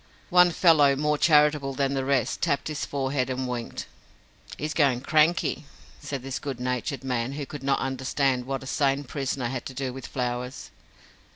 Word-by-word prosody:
One 180 Hz, 0 st, +7 dB
fellow, 155 Hz, -5 st, +5 dB
more 150 Hz, +2 st, +1 dB
charitable 150 Hz, -3 st, +4 dB
than 135 Hz, 0 st, 0 dB
the 135 Hz, -1 st, -1 dB
rest, 135 Hz, -3 st, 0 dB
tapped 150 Hz, -2 st, 0 dB
his 150 Hz, -2 st, -3 dB
forehead 135 Hz, -2 st, -1 dB
and 130 Hz, 0 st, -2 dB
winked. 120 Hz, -2 st, -4 dB, 0.7 s
"He's 155 Hz, +1 st, -3 dB
going 135 Hz, -6 st, +2 dB
cranky," 155 Hz, +2 st, +2 dB, 0.4 s
said 140 Hz, -3 st, -5 dB
this 135 Hz, 0 st, -4 dB
good 140 Hz, -4 st, -5 dB
natured 125 Hz, +3 st, -2 dB
man, 125 Hz, 0 st, -2 dB
who 145 Hz, 0 st, -4 dB
could 145 Hz, 0 st, -8 dB
not 135 Hz, 0 st, +1 dB
understand 130 Hz, -1 st, 0 dB
what 135 Hz, -1 st, -3 dB
a -, -, -9 dB
sane 140 Hz, +1 st, +1 dB
prisoner 135 Hz, -2 st, -3 dB
had 130 Hz, -1 st, -4 dB
to 130 Hz, -, -9 dB
do 130 Hz, -1 st, -3 dB
with 135 Hz, 0 st, -8 dB
flowers. 125 Hz, 0 st, -4 dB
135 Hz, 175 wpm, -26 LUFS, 130-145 Hz, 0.7 s, One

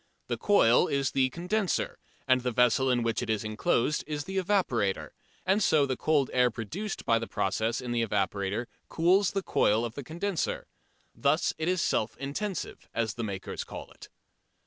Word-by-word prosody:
The -, -, -1 dB
coil 125 Hz, -, +4 dB
is 140 Hz, -1 st, 0 dB
the 130 Hz, -1 st, +2 dB
"condenser" 180 Hz, +7 st, -1 dB, 0.3 s
and 130 Hz, -1 st, +4 dB
the 125 Hz, -, -1 dB
vessel 125 Hz, +2 st, +3 dB
in 120 Hz, -2 st, +2 dB
which 115 Hz, -1 st, 0 dB
it 120 Hz, -, -4 dB
is 110 Hz, -1 st, 0 dB
enclosed 115 Hz, +6 st, 0 dB
is 150 Hz, -1 st, -3 dB
the 190 Hz, +2 st, -2 dB
"evaporator," 175 Hz, -, 0 dB, 0.3 s
and 195 Hz, +3 st, +3 dB
so 155 Hz, -7 st, +4 dB
the 130 Hz, -1 st, -1 dB
cold 145 Hz, -1 st, +1 dB
air 125 Hz, -1 st, +4 dB
produced 155 Hz, -, -5 dB
by 115 Hz, 0 st, +3 dB
the 115 Hz, -, -5 dB
process 110 Hz, +5 st, -1 dB
in 125 Hz, -1 st, -5 dB
the 120 Hz, -1 st, +1 dB
evaporator 100 Hz, +1 st, -1 dB, 0.2 s
cools 180 Hz, +4 st, +3 dB
the 195 Hz, -1 st, -2 dB
coil 110 Hz, -, +2 dB
of 115 Hz, -, -5 dB
the 140 Hz, -, -6 dB
condenser. 175 Hz, +5 st, -2 dB, 0.5 s
Thus 145 Hz, +3 st, +1 dB
it 160 Hz, -, -1 dB
is 180 Hz, -1 st, +1 dB
"self 110 Hz, 0 st, 0 dB
intensive," 180 Hz, +9 st, -4 dB
as 115 Hz, -2 st, 0 dB
the 120 Hz, -, -5 dB
makers 100 Hz, -3 st, -4 dB
call -, -, -9 dB
it. -, -, -14 dB
130 Hz, 180 wpm, -29 LUFS, 115-175 Hz, 0.5 s, coil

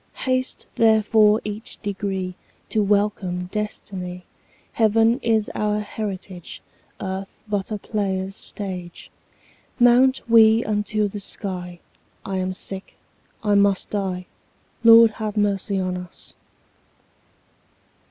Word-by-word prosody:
35 -, -, -8 dB
Haste 255 Hz, 0 st, -1 dB
therefore 220 Hz, -1 st, +4 dB
each 210 Hz, +2 st, -6 dB
degree 195 Hz, -2 st, -3 dB, 0.4 s
To 215 Hz, -, +1 dB
welcome 200 Hz, -3 st, 0 dB
destiny; 185 Hz, -4 st, -5 dB, 0.5 s
Heaven 225 Hz, +2 st, +3 dB
is 220 Hz, -4 st, +1 dB
our 210 Hz, 0 st, 0 dB
heritage, 195 Hz, -4 st, -6 dB, 0.4 s
Earth 190 Hz, 0 st, -6 dB
but 205 Hz, -2 st, -2 dB
a 210 Hz, -, -1 dB
player's 195 Hz, -2 st, -2 dB
stage. 185 Hz, -5 st, -6 dB, 0.7 s
Mount 245 Hz, +2 st, +4 dB
we 225 Hz, 0 st, +6 dB
unto 210 Hz, 0 st, 0 dB
the 205 Hz, +1 st, -6 dB
sky; 180 Hz, -3 st, -5 dB, 0.5 s
40 195 Hz, -1 st, -3 dB
I -, -, 0 dB
am 185 Hz, 0 st, -2 dB
sick, 190 Hz, 0 st, -4 dB, 0.5 s
I 210 Hz, -1 st, +2 dB
must 200 Hz, -1 st, +2 dB
die— 190 Hz, -3 st, -2 dB, 0.6 s
Lord, 230 Hz, 0 st, +8 dB
have 215 Hz, -1 st, -5 dB
mercy 200 Hz, -1 st, +1 dB
on 185 Hz, -1 st, -1 dB
us! 180 Hz, -1 st, -10 dB
205 Hz, 115 wpm, -23 LUFS, 190-220 Hz, 0.7 s, Lord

